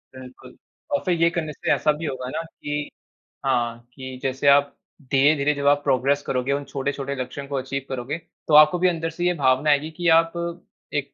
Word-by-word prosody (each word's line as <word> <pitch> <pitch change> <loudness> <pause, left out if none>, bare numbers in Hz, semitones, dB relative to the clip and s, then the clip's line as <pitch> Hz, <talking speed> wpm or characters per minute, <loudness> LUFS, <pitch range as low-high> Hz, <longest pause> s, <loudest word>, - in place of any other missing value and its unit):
बिल्कुल, 130 0 -13 0.3
और 285 - +1
फिर 175 -3 0
ये 170 - +5
करने 165 -2 -3
से - - -2
ऐसा 150 - +2
भी 165 - -5
होगा 130 -3 -4
ना 160 +4 -3
कि 150 -2 -5 0.6
हाँ, 120 -3 0
कि 130 -1 -8
जैसे 135 +2 -1
आप 140 0 +5 0.4
धीरे-धीरे 145 +1 +3
जब 140 -1 -2
आप 145 0 +4
प्रोग्रेस 140 +1 +2
करोगे, 125 +1 -1
उन 145 +1 -2
छोटे-छोटे 140 0 -3
लक्ष्यों 140 +2 -6
को 140 - -4
अचीव 135 0 -3
करोगे, 130 +3 -4 0.3
तो 155 - 0
आपको 155 +3 +7
भी 185 - +3
अंदर 165 -1 -2
से 175 +2 -4
ये 180 - +3
भावना 135 +1 +2
आएगी 150 +2 +2
कि 175 - -1
आप 165 0 -2 0.6
एक 145 -1 -2
140 Hz, 200 wpm, -23 LUFS, 130-155 Hz, 0.6 s, आपको